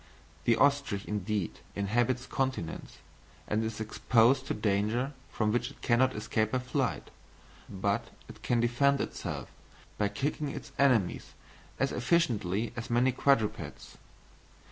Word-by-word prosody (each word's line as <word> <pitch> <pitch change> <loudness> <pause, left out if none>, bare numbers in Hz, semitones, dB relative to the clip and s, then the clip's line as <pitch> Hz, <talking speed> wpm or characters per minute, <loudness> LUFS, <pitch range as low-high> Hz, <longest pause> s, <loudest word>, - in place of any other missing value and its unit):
The 115 - +5
ostrich 140 -6 +2
indeed 105 -2 -2 0.2
inhabits 120 +5 +1
continents, 130 -12 -3 0.5
and 110 +2 0
is 110 -1 -4
exposed 120 +4 +3
to - - -1
danger 105 +6 0 0.2
from 105 -1 0
which 120 +2 0
it - - -17
cannot 125 +2 +3
escape 110 +1 -1
by - - +3
flight, 125 -1 -2 0.6
but 100 +1 -1 0.2
it - - -12
can 120 - +1
defend 135 +4 +3
itself, - - -4 0.5
by 105 - +3
kicking 140 +7 -2
its - - -7
enemies, 125 -10 +2 0.5
as 135 - +1
efficiently 120 - +1
as 120 -1 -5
many 120 +2 +3
quadrupeds. 125 -4 0
120 Hz, 125 wpm, -30 LUFS, 105-130 Hz, 0.6 s, The